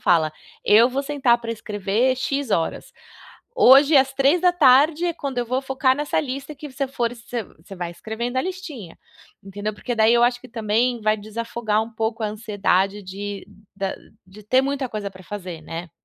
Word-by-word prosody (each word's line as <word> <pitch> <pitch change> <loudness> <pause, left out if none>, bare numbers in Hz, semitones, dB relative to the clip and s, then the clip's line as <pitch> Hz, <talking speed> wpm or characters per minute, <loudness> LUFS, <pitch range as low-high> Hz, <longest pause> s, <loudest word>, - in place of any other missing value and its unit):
fala: 160 -3 +3 0.3
"Eu 225 +4 +6
vou 265 +2 -2
sentar 275 -4 +2
pra 230 -1 -4
escrever 215 +3 0
x 275 0 -2
horas. 165 -4 -1 0.6
Hoje 285 - +7
às 270 0 +3
15h 300 0 +4
é 345 - 0
quando 280 -6 -5
eu 245 - 0
vou 255 +3 -1
focar 265 -1 +1
nessa 290 +2 -2
lista" 275 +1 -6
que 290 0 -9
você 275 +1 -2
for 240 -3 -2
se 235 0 -6
você 180 +1 -14
vai 175 -2 -5
escrevendo 235 +7 -5
a - - +3
listinha, 305 - -7 0.5
entendeu. 205 +2 -5
Porque 245 +4 -4
daí 220 0 +4
eu 240 0 +4
acho 245 0 +2
que - - -13
também 230 +2 0
vai 215 0 +2
desafogar 220 0 -2
um 225 - -10
pouco 225 0 -2
a - - +1
ansiedade 205 -2 0
de 200 +1 -6 0.3
da 195 -1 -2 0.3
de 195 +3 -15
ter 255 +6 +3
muita 275 -1 -2
coisa 210 -3 -5
pra 185 0 -14
fazer, 185 -4 -7
né. 165 +2 -7
235 Hz, 185 wpm, -22 LUFS, 205-270 Hz, 0.6 s, Hoje